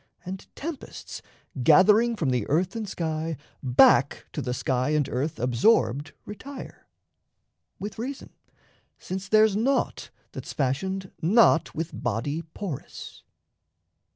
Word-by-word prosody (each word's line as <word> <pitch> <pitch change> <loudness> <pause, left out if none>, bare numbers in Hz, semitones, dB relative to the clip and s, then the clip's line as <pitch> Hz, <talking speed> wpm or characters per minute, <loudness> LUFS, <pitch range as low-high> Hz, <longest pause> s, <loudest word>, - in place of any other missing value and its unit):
And 185 +1 -7
tempests, 310 -1 -7 0.4
gathering 215 - +5
from 155 -11 0
the 125 -5 -1
earth 175 +8 +1
and 220 -3 -4
sky, 160 -2 -3 0.2
Back 125 -2 +4
to - - -3
the 125 - -3
sky 130 +1 0
and 150 -3 +1
earth 140 +5 -3
absorbed 130 - +2
retire 260 +7 -9 0.9
With 205 +1 -7
reason, 265 +4 -6 0.7
since 190 +1 -6
there's 215 -1 +5
naught 255 +6 0 0.2
that's - - -7
fashioned 185 +8 -2
not 180 -1 +4
With 165 +1 -3
body 125 +6 -2
porous. 165 -2 -8
175 Hz, 115 wpm, -26 LUFS, 140-210 Hz, 0.9 s, gathering